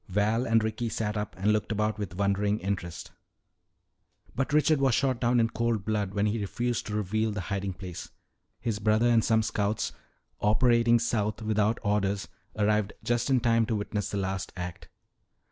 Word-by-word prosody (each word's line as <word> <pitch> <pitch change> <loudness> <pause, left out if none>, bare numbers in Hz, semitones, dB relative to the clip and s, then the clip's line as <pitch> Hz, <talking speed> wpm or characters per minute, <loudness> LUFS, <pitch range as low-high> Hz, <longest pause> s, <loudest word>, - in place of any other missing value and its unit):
Val 105 +5 +1
and 115 -1 +3
Ricky 110 +2 -2
sat 105 -1 -2
up 105 0 -3
and 105 +3 +2
looked 105 +1 -1
about 105 0 0
with 95 -4 -5
wondering 100 +1 +1
interest. 95 -4 -4 1.2
"But 135 +1 -1
Richard 150 -1 +3
was 130 -4 +3
shot 130 -4 0
down 120 0 +3
in 115 0 +2
cold 115 -4 -1
blood 105 -3 -1
when 100 0 +2
he 105 +2 0
refused 120 +5 -2
to 105 - -3
reveal 110 +2 0
the 105 - -4
hiding 100 -1 -2
place. 90 -1 -8 0.5
His 115 -3 -2
brother 110 +2 +2
and 115 -2 +4
some 110 -1 +3
scouts, 105 0 -1 0.5
operating 120 +2 +4
south 110 -2 -1
without 110 +1 +1
orders, 100 -1 0 0.3
arrived 105 -1 +1
just 120 +2 0
in 130 -2 +3
time 115 -1 +3
to 115 - 0
witness 105 0 -2
the 100 - -3
last 95 -1 -2
act. 90 0 -6
105 Hz, 175 wpm, -28 LUFS, 100-115 Hz, 1.2 s, and